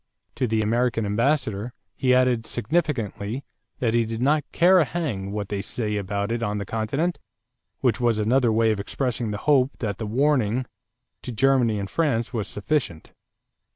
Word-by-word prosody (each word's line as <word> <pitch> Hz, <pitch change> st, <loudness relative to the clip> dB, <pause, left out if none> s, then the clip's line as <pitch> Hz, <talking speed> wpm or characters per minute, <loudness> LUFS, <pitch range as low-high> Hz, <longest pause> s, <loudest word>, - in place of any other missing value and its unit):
To 125 Hz, -, -1 dB
the 110 Hz, -1 st, +1 dB
American 115 Hz, 0 st, +1 dB
ambassador 115 Hz, 0 st, 0 dB, 0.2 s
he 130 Hz, +3 st, +1 dB
added 125 Hz, -3 st, +2 dB
significantly 120 Hz, -, -2 dB, 0.3 s
that 115 Hz, -3 st, 0 dB
he 120 Hz, 0 st, +3 dB
did 115 Hz, 0 st, -4 dB
not 145 Hz, +4 st, +2 dB
"care 180 Hz, +2 st, +5 dB
a -, -, +5 dB
hang 120 Hz, -, -3 dB
what 105 Hz, -1 st, -4 dB
they 100 Hz, -1 st, -2 dB
say 105 Hz, +1 st, -3 dB
about 100 Hz, +1 st, -2 dB
it 115 Hz, 0 st, -1 dB
on 105 Hz, -2 st, -1 dB
the 100 Hz, -, -3 dB
continent," 140 Hz, -, -1 dB, 0.6 s
which 125 Hz, -1 st, +1 dB
was 120 Hz, -2 st, +2 dB
another 115 Hz, +3 st, +2 dB
way 110 Hz, 0 st, +3 dB
of 105 Hz, -, -1 dB
expressing 120 Hz, +2 st, -2 dB
the 105 Hz, -, -3 dB
hope 140 Hz, -2 st, +3 dB
that 105 Hz, -5 st, -3 dB
the 110 Hz, -, -3 dB
warning 130 Hz, -1 st, +1 dB, 0.6 s
to 125 Hz, -, -6 dB
Germany 125 Hz, -2 st, +3 dB
and 100 Hz, -1 st, -3 dB
France 125 Hz, -3 st, 0 dB
was 110 Hz, -4 st, -2 dB
sufficient. 105 Hz, -, -2 dB
115 Hz, 170 wpm, -24 LUFS, 105-135 Hz, 0.6 s, care